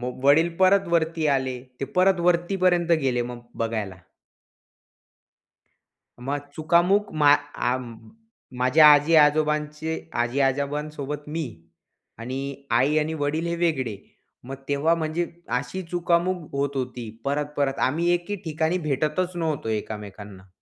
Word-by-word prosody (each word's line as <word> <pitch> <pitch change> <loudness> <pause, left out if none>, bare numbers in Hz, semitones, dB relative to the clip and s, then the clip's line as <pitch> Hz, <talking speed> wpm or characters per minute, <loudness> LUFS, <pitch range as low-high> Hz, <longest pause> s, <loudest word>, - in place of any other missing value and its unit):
मो 125 +1 -3
वडील 155 +4 +5
परत 190 +1 +4
वरती 165 -1 +1
आले. 130 -3 0 0.2
ते - - 0
परत 185 0 +4
वरतीपर्यंत 175 0 +2
गेले 125 -2 +1
मग 120 0 -7
बघायला. 110 -4 -3 2.3
मग 145 +1 -3
चुकामुक 175 +6 +2
मा 145 0 +7
आ 145 -3 -2 0.8
माझ्या 135 +5 +6
आजी-आजोबांचे, 150 +1 +3 0.3
आजी-आजोबांसोबत 140 +3 -2
मी 160 +1 -3 0.7
आणि 130 +3 -4 0.4
आई 145 +5 +2
आणि 155 +1 -1
वडील 155 +4 -1
हे 170 - -1
वेगळे. 140 -11 -1 0.5
मग 135 +2 -6
तेव्हा 145 +4 +2
म्हणजे 165 +1 -2 0.3
अशी 185 +8 -6
चुकामक 175 -1 0
होत 140 0 -2
होती. 125 -3 -4
परत-परत 145 -1 -1
आम्ही 170 +6 0
एके 175 +4 -3
ठिकाणी 160 +2 0
भेटतच 155 +6 -1
नव्हतो 160 -8 -2
एकामेकांना. 105 -2 -6
150 Hz, 115 wpm, -24 LUFS, 135-170 Hz, 2.3 s, मा